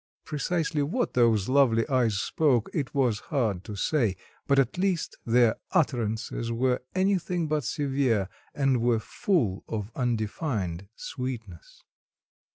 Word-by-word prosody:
precisely 155 0 -1
what 185 - -1
those 115 -5 +3
lovely 130 -4 +3
eyes 125 -6 +2
spoke, 125 +1 +1
it 145 -4 -3
was 125 -6 +2
hard 110 - 0
to 105 - -7
say; 115 -3 +1 0.3
but 140 - +3
at 135 +5 +2
least 185 -3 0
their 115 -1 +4 0.2
utterances 115 -4 0
were 125 +2 +1
anything 185 -3 +1
but 150 -1 0
severe, 135 - 0 0.3
and 135 -4 +2
were 120 -1 +3
full 115 - 0
of 105 -1 -4
undefined 110 - -2
sweetness. 120 - -7
125 Hz, 125 wpm, -27 LUFS, 110-145 Hz, 0.3 s, their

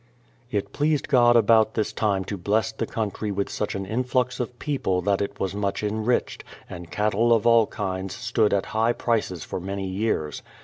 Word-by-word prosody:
It 100 -3 -3
pleased 150 0 +1
God 120 -1 +5
about 110 -1 +4
this 110 - -1
time 100 -3 0
to 100 - -4
bless 105 +4 0
the 110 - -4
country 105 -1 -3
with 100 0 -2
such 105 - -3
an 95 0 -3
influx 125 +4 -1
of 125 0 -4
people 95 - -1
that 100 -1 +1
it 100 0 -4
was 95 -1 -1
much 100 0 -2
enriched, 110 +3 -1 0.2
and 85 -1 -9
cattle 105 +4 +1
of 115 -3 +3
all 115 -2 +5
kinds 95 -1 -4
stood 115 -2 +1
at 100 -1 +1
high 115 +2 +2
prices 110 -9 -1
for - - -5
many 95 +2 -4
years. 95 -6 -2
105 Hz, 185 wpm, -25 LUFS, 100-115 Hz, 0.2 s, God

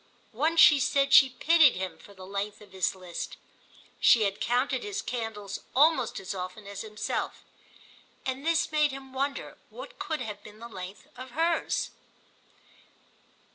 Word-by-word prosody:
Once 315 +8 +1
she 295 -2 +8
said 275 +2 +2
she 270 - +9
pitied 315 +3 +5
him 185 -2 -4
for 200 - -16
the 185 0 -11
length 200 +2 -4
of 205 -2 -16
his 190 0 0
list—she 185 +4 -1
had 200 0 -1
counted 250 +2 +1
his 415 -1 -4
candles 225 - -4 0.2
almost 315 +4 +3
as 190 - -5
often 185 +2 -6
as 200 -1 -6
himself—and 255 +4 -7
this 325 -1 +1
made 300 -1 +3
him 265 -1 -10
wonder 275 +1 -3
what - - -11
could 315 -1 -3
have 210 -3 -6
been 210 0 -13
the 230 +2 -9
length 185 -2 -9
of 255 +1 -9
hers. 330 +1 0
245 Hz, 145 wpm, -28 LUFS, 200-290 Hz, 0.2 s, she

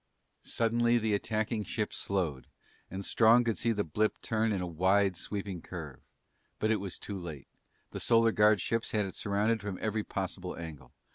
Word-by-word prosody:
Suddenly 120 +1 +2
the 110 -2 0
attacking 110 +1 -1
ship 105 0 -2
slowed 85 -9 -2 0.4
and 95 +2 -5
Strong 115 +2 +5
could 115 -2 -1
see 115 - +2
the 105 -2 0
blip 105 +6 0
turn 110 0 +1
in 100 - 0
a 90 - -2
wide 95 +3 +2
sweeping 100 -1 -5
curve. 80 -7 -8 0.6
But 110 - +1
it 110 - +3
was 95 -2 -5
too 100 -2 -6
late. 80 -6 -8 0.4
The - - -5
Solar 115 -1 +4
Guard 105 -1 +5
ships 115 0 -1
had 105 -2 +2
it 95 - -6
surrounded 105 +2 0
from 100 -2 -4
every 110 0 -1
possible 95 -2 -4
angle. 75 -6 -8
105 Hz, 180 wpm, -31 LUFS, 95-110 Hz, 0.6 s, Strong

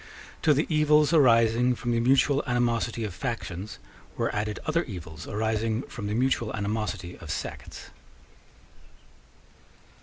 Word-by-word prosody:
To 150 -2 +4
the 150 - +1
evils 150 0 +3
arising 120 -3 +4
from 120 0 -3
the 115 - +2
mutual 135 +3 +3
animosity 120 -2 0
of 105 -4 -4
factions 105 -2 -5 0.4
were - - -1
added 105 0 -2
other 165 +1 +1
evils 85 - -8
arising 110 +2 -1
from 105 -5 -7
the 105 - -2
mutual 120 -2 +1
animosity 105 -4 -3
of 85 - -10
sects. - - -6
115 Hz, 125 wpm, -27 LUFS, 105-130 Hz, 0.4 s, To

